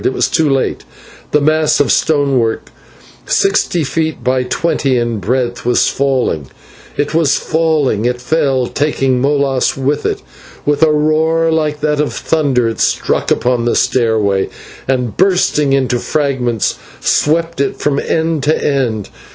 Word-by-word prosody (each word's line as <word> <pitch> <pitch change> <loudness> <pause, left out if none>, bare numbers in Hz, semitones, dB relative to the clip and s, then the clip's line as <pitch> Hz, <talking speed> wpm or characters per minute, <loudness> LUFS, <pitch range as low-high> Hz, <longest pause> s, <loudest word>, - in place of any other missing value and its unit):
It - - +1
was - - 0
too 160 -3 +1
late; 135 -1 -1 0.5
the 150 - +2
mass 155 +1 +2
of 145 - +2
stonework, 135 -7 +1 0.6
sixty 190 -3 +1
feet 160 +3 -1
long - - -19
by 130 0 +1
twenty 135 -1 0
in 120 -2 -1
breadth, 120 +4 -2
was 120 0 +2
falling. 130 - -1 0.5
It 145 - -1
was 160 -4 +2
falling 155 -9 0
it 125 0 0
fell, 135 -1 0
taking 135 -2 0
Molas 140 -2 +1
with 135 +2 -1
it. - - -3 0.4
With 145 0 0
a 160 -1 +5
roar 160 +2 +1
like 155 -2 -1
that 150 -1 0
of 150 - -2
thunder 140 -7 0
it 115 - -4
struck - - 0
upon 120 -1 +1
the 120 - +1
stairway, 110 -5 +1 0.4
and, 125 -4 -1
bursting 180 -6 +2
into 130 -3 +1
fragments, 130 -7 -1 0.2
swept 165 0 +1
it 140 - -1
from 145 -1 0
end 160 -2 -1
to 155 - +2
end. 120 -8 -1
140 Hz, 150 wpm, -15 LUFS, 125-155 Hz, 0.6 s, a